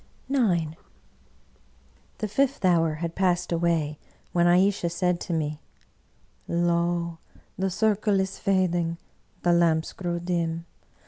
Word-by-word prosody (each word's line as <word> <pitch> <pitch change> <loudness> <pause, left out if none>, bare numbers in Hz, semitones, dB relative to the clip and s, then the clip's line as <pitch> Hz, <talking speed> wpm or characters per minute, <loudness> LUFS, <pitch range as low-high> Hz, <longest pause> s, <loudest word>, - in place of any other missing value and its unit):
IX 165 -3 0 1.5
The 215 - -2
fifth 270 +1 0
hour 165 -3 +3
had 165 +1 -4
passed 180 -2 +1
away, 165 -3 0 0.3
when 175 0 +4
Ayesha 180 0 +3
said 180 0 0
to 175 - -6
jtne, 155 -2 -2 0.5
" - - -38
Lo! 170 -1 0 0.4
the 190 +1 -1
circle 210 +1 +2
is 190 0 -2
fading; 175 -3 +1 0.5
the 175 - +4
lamps 165 -2 +2
grow 175 -2 -3
dim. 170 -1 -2
175 Hz, 120 wpm, -26 LUFS, 165-185 Hz, 1.5 s, when